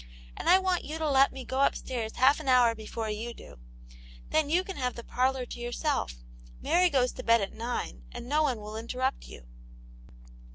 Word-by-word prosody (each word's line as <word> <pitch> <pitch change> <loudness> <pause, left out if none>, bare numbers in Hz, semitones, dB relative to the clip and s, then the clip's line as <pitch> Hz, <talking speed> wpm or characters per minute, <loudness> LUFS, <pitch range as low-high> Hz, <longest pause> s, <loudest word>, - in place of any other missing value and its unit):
And - - -2
I 370 - +8
want 375 -2 0
you 310 +2 -5
to 320 -1 -1
let 275 -1 +5
me 265 -1 -8
go 265 +2 -1
upstairs 240 -5 -1
half 270 +4 +4
an 305 - -8
hour 250 -3 +5
before 220 0 -5
you 230 +3 -5
do: 60 - -13 0.7
then 310 -2 +2
you 350 +4 +3
can 385 0 -7
have 250 -2 -2
the 235 - -8
parlour 255 +1 0
to - - -8
yourself; 240 - -2 0.4
Mary 360 +1 +3
goes 255 -5 +2
to - - -8
bed 230 0 +5
at 195 - -3
nine, 225 - -4
and - - -8
no 300 +4 +2
one 265 -7 +1
will 210 +1 -8
interrupt 250 +4 -2
you." - - -12
255 Hz, 200 wpm, -29 LUFS, 230-290 Hz, 0.7 s, I